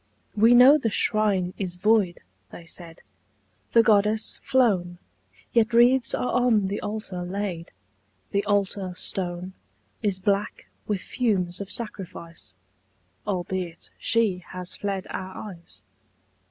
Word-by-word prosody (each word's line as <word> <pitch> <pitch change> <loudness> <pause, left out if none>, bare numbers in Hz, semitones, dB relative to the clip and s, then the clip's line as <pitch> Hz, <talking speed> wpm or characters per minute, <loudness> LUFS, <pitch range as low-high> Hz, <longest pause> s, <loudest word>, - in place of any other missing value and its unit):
"We 225 +3 +6
know 265 +5 +8
the 230 - 0
Shrine 205 -4 +1
is 185 -3 -3
void," 195 -1 +2 0.3
they 170 - -11
said, 165 0 -9 0.7
"The 230 - +7
Goddess 215 -1 +2
flown 190 -9 +2 0.6
Yet 230 0 +3
wreaths 245 +1 +4
are - - -1
on 220 -6 +3
the 200 - -3
Altar 205 -4 -4
laid 180 -2 -4 0.6
The 200 0 +1
Altar 200 -2 0
Stone 180 0 -3 0.5
Is 205 -4 +1
black 200 +1 -1 0.2
with 205 -3 -1
fumes 190 -7 -1
of 200 - -6
sacrifice, 170 - -6 0.7
Albeit 180 -3 -4
She 225 -6 +2
has 180 -1 -6
fled 195 -2 -3
our 190 0 -6
eyes. 170 - -13
200 Hz, 120 wpm, -25 LUFS, 180-220 Hz, 0.7 s, know